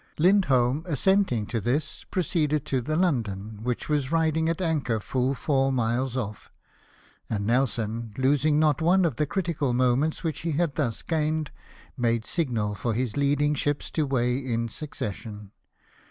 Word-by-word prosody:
Lindholm 150 -7 +3
assenting 165 - +2
to 115 +1 -3
this, 140 +8 -2
proceeded 155 -5 0
to 130 -4 0
the 155 +6 -2
London, 110 - -1
which 125 +1 -2
was 145 -2 0
riding 160 -1 +2
at 165 - -1
anchor 150 -10 0
full 130 +5 -1
four 135 -1 +1
miles 125 +1 0
off; 105 -5 -5 0.8
and 100 -2 -2
Nelson, 115 -2 0
losing 145 +3 +3
not 150 -2 +3
one 180 +3 +4
of 145 -9 -1
the 150 - +1
critical 165 -7 -1
moments 130 +5 +1
which 160 -2 -2
he 165 -1 -2
had 160 -1 0
thus 125 -6 -2
gained, 155 -2 -1 0.4
made 115 -2 0
signal 115 -11 -1
for 115 +2 -2
his 120 -2 -1
leading 145 +1 +2
ships 145 0 -2
to 155 -3 0
weigh 125 -1 +1
in 115 -3 -2
succession. 105 -7 -6
135 Hz, 155 wpm, -26 LUFS, 120-155 Hz, 0.8 s, one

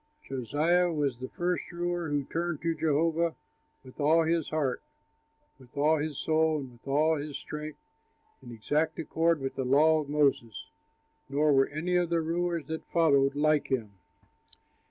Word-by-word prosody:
Josiah 155 +8 +1
was 140 -6 -1
the 130 - -6
first 180 +1 -2
ruler 175 -1 -2
who 145 -1 0
turned 165 +2 -3
to 165 0 +1
Jehovah 160 +2 +1 0.5
with 130 +2 -15
all 160 +3 +4
his 165 -1 0
heart, 145 -5 -1 0.8
with 130 +2 -18
all 155 +2 +3
his 150 -2 -3
soul, 160 0 +1
and 135 -3 -7
with 120 +2 -20
all 155 +3 +2
his 145 0 -5
strength 150 0 -7 0.6
in 120 - -11
exact 150 +8 -1
accord 165 0 +1
with 135 -1 -4
the 130 - -3
law 155 +5 +4
of 145 - -9
Moses, 140 -7 0 0.6
nor 145 +2 +2
were 135 0 +4
any 170 +5 -1
of 175 -1 +1
the 170 -1 +1
rulers 170 -1 -2
that 160 +2 -5
followed 140 -5 +3
like 150 0 +2
him. 120 -6 -2
155 Hz, 160 wpm, -29 LUFS, 140-165 Hz, 0.8 s, all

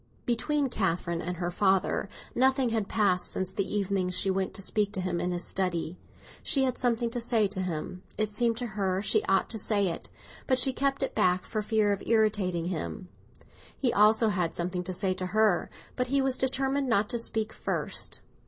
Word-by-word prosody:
Between 280 +4 0
Catherine 170 -6 -1
and 180 +1 -4
her 175 0 -2
father 190 +1 +1 0.2
nothing 260 0 +3
had 220 -3 -1
passed 185 -5 +2
since 190 0 -2
the 195 - -2
evening 195 -2 0
she 185 +1 +1
went 190 0 -1
to - - -2
speak 205 +1 0
to - - -1
him 180 -2 -1
in 180 - -1
his 175 0 -2
study. 180 -3 -1 0.5
She 270 - +2
had 255 -2 -1
something 235 -2 0
to 240 - -3
say 230 -3 +2
to 190 -1 -3
him—it 185 +5 -4
seemed 230 +1 +1
to 245 - -2
her 195 -3 -1
she 430 - +3
ought - - +2
to 220 - -1
say 200 -2 +2
it; 165 - -6 0.4
but 260 - +3
she 260 +1 +4
kept 275 +1 0
it 270 - -2
back, 180 0 +2
for 215 - -2
fear 210 -1 +2
of 200 - -1
irritating 205 -6 +1
him. 180 +2 -4 0.7
He 250 -4 +1
also 215 +2 +5
had 180 -5 -1
something 180 +1 -2
to 185 - -4
say 190 0 0
to 185 0 -4
her; 215 -5 +3 0.3
but 250 0 -1
he 275 +2 +2
was 265 -1 +1
determined 270 +1 0
not 210 -2 +2
to 240 - -2
speak 220 -1 -1
first. - - -2
205 Hz, 200 wpm, -28 LUFS, 185-240 Hz, 0.7 s, also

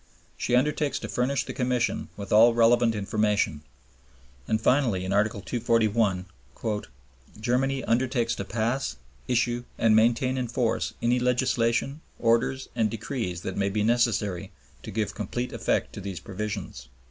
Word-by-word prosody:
She 125 - 0
undertakes 150 +2 +1
to - - -5
furnish 130 +3 0
the - - -6
Commission 125 -1 -1
with 100 -1 -4
all 115 +2 +7
relevant 120 0 +4
information. 105 -6 0 0.9
And 110 - +1
finally 115 -6 +2
in 95 - -1
Article 105 0 +1
241, 110 -5 +1 1.1
"Germany 130 +3 0
undertakes 120 0 +1
to - - -4
pass, 115 - -1 0.3
issue, 120 -1 +1
and 110 -1 +4
maintain 120 +4 +3
in 125 - -2
force 120 0 -1
any 120 +1 +3
legislation, 125 +2 +1 0.2
orders, 115 +3 +1
and 110 -1 +2
decrees 110 - -4
that 95 - -5
may 100 0 +1
be 105 +1 0
necessary 105 -5 +1 0.3
to - - -8
give 105 -1 -2
complete 120 +4 -4
effect - - -1
to - - -7
these 95 -3 -5
provisions." 100 - -5
115 Hz, 140 wpm, -26 LUFS, 105-125 Hz, 1.1 s, all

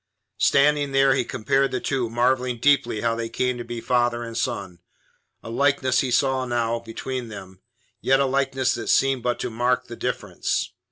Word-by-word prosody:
Standing 145 0 +3
there, 135 0 +4
he 130 -1 +1
compared 130 +3 0
the 130 - -2
two, 125 -3 -1
marvelling 125 +1 +1
deeply 120 -4 +2
how 115 -1 +1
they 115 0 -4
came 125 0 -1
to - - -4
be 120 0 -6
father 120 0 +1
and 115 -1 -7
son. 100 -8 -3 0.6
A - - -8
likeness 135 0 +2
he 130 - 0
saw 130 +1 +2
now 120 -2 -1
between 120 +2 -5
them, 95 -3 -10 0.4
yet 135 +1 +3
a 140 - +3
likeness 135 -1 +1
that - - -5
seemed 135 -2 +3
but 120 0 -1
to - - -3
mark 125 +2 0
the 120 - -9
difference. - - -2
125 Hz, 180 wpm, -23 LUFS, 115-135 Hz, 0.6 s, there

